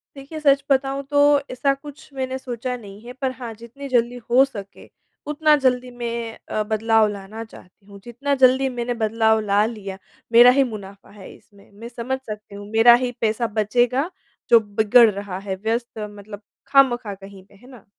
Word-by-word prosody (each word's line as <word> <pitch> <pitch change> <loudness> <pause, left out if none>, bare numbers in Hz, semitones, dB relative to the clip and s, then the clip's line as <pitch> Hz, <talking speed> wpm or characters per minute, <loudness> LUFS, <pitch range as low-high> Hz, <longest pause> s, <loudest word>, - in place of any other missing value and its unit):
देखिए, 275 +3 -9
सच 280 -2 +3
बताऊँ 275 +1 +1
तो, 285 +1 +4
ऐसा 275 +2 +1
कुछ 285 +1 -12
मैंने 260 -1 -3
सोचा 250 -1 -5
नहीं 205 -3 -12
है, 245 - -8
पर 260 0 -3
हाँ 235 -3 -6
जितनी 245 +5 -10
जल्दी 245 -1 +1
हो 250 +3 +6
सके, 200 -7 -11 0.4
उतना 300 +1 +3
जल्दी 250 -1 +1
मैं 235 -1 -5
अ, 215 - -1
बदलाव 220 +1 +2
लाना 205 +3 -8
चाहती 195 -3 -17
हूँ, 200 0 -14
जितना 270 +4 -2
जल्दी 260 0 +4
मैंने 240 +1 -2
बदलाव 220 0 +2
ला 205 0 +2
लिया, 205 -4 -6 0.3
मेरा 240 +1 +8
ही - - +6
मुनाफा 200 -2 -10
है 190 - -11
इसमें। 200 0 -22
मैं 230 - -8
समझ 250 +2 -4
सकती 210 -1 -9
हूँ, 205 0 -10
मेरा 225 +2 +7
ही 250 - -1
पैसा 225 +1 0
बचेगा 245 - +1 0.4
जो 235 - +8
बिगड़ 220 +2 +4
रहा 200 -2 -6
है 195 -1 -5
व्यस्त 230 +1 -2
मतलब 205 0 -11 0.3
खामखा 250 -6 +3
कहीं 195 0 -13
पे 200 - -23
है 245 +6 -19
ना? 240 -6 -15
235 Hz, 180 wpm, -22 LUFS, 210-260 Hz, 0.4 s, मेरा